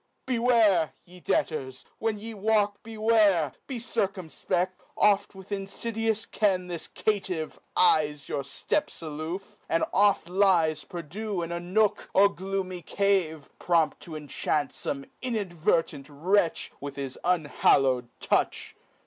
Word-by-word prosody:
Beware, 230 -9 +3
ye 180 +1 -14
debtors, 130 -6 -1
when 220 -1 0
ye 225 +2 -7
walk 210 -1 +1
beware, 215 - +3
Be 265 - -4
circumfpecl:, 190 -5 -1 0.3
oft 200 -1 +3
with 190 0 -12
infidious 220 +2 -2
ken 190 -4 +1
This 170 -2 -5
caitiff 190 -7 -2 0.2
eyes 150 -5 +3
your 140 - -2
fteps 145 - -2
aloof, 160 +5 -6
and 165 - +2
oft 205 -2 +3
Lies 175 -5 +3
perdue 180 +5 -4
in 165 - -5
a 170 - -2
nook 195 +4 +1
or 200 +1 +7
gloomy 190 -1 -4
cave, 175 -5 0
Prompt 165 -3 +2
to 160 - -9
inchant 150 0 -1
fome 140 -1 -4
inadvertent 175 - 0
wretch 170 +4 +1
With 140 -1 -6
his 135 -2 -5
unhallow'd 135 -7 +3
touch. - - 0
185 Hz, 125 wpm, -27 LUFS, 155-205 Hz, 0.3 s, or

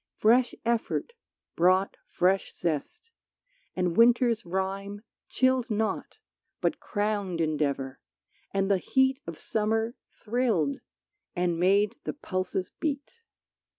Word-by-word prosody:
Fresh 240 +3 +3
effort 235 - -1 0.4
brought 185 +3 +3
fresh 190 +2 +1
zest, 180 - -3 0.6
and 180 -2 0
winter's 235 -1 +4
rime 195 +3 -3 0.3
Chilled 260 -1 +2
not 220 0 -2 0.4
but - - 0
crowned 205 -4 -2
endeavor, 140 -4 -1 0.5
and 195 0 +1
the 195 - +3
heat 265 +5 +2
Of 165 -2 -6
summer 220 +2 0 0.2
thrilled, 215 - 0 0.6
and 175 -1 0
made 200 +4 +3
the - - -3
pulses 185 -7 -3
beat. 285 -3 -2
200 Hz, 105 wpm, -28 LUFS, 180-235 Hz, 0.6 s, winter's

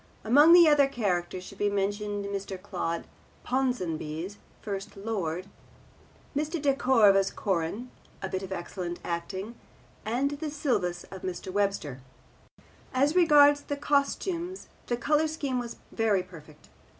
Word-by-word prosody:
Among 290 +9 +7
the 345 -2 +9
other 290 -2 +5
characters 185 -7 -2
should 195 +1 -12
be 205 - +2
mentioned 205 +1 -1
Mr. 200 -1 -4
Claude 180 -4 -3 0.4
Ponsonby's 185 -8 -2 0.2
First 200 -1 -6
Lord, 190 -5 -3 0.9
Mr. 305 +3 -1
De 280 -1 +2
Cordova's 210 -8 +4
Corin 200 +6 -2 0.3
(a 190 - -4
bit 185 0 -3
of 190 -1 -7
excellent 175 -1 -5
acting), 185 +5 -4 0.5
and 245 +6 0
the 300 +2 -4
Silvius 240 - -1
of 190 -1 -8
Mr. 185 0 -5
Webster. 195 -10 -1 0.9
As 280 +5 +3
regards 290 -4 +6
the 285 - -4
costumes 335 +6 -1 0.2
the 240 - 0
colour 300 +5 +2
scheme 285 -5 -2
was 235 -1 -5 0.2
very 210 -5 +1
perfect. 155 -4 -15
205 Hz, 130 wpm, -28 LUFS, 185-280 Hz, 0.9 s, the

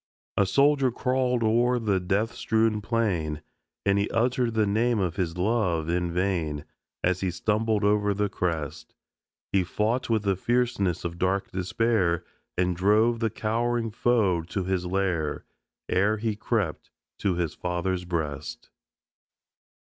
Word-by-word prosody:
A 100 - +3
soldier 140 +2 +4
crawled 125 -1 0
o'er 120 +3 +3
the 105 -5 +1
death 100 +5 0
strewn 110 -2 +1
plain, 95 -10 -1 0.4
And 100 0 +3
he 100 - 0
uttered 120 0 +1
the 110 -1 +3
name 115 +4 +2
of 90 -5 -1
his 90 -4 -2
love, 90 -5 +1
in 85 0 0
vain, 85 -5 -1 0.4
As 90 0 +2
he 95 - 0
stumbled 105 +4 0
over 105 0 +3
the 105 +1 +1
crest; 80 -4 -3 0.6
He 95 -2 +3
fought 110 +8 -1
with 110 -2 +1
the 100 -2 +2
fierceness 115 -5 0
of 85 0 -4
dark 95 +1 0
despair 95 -2 +1 0.3
And 90 0 +1
drove 105 +6 +3
the 115 -1 +1
cowering 115 +2 -1
foe 105 -6 +2
to 90 +4 -3
his 90 -1 -1
lair 90 -5 -1 0.4
Ere 100 +4 +2
he 110 0 -1
crept 105 -6 -2 0.3
to 95 -3 +1
his 85 -3 -1
Father's 90 +1 -2
breast. 75 -8 -4
100 Hz, 140 wpm, -26 LUFS, 90-115 Hz, 0.6 s, soldier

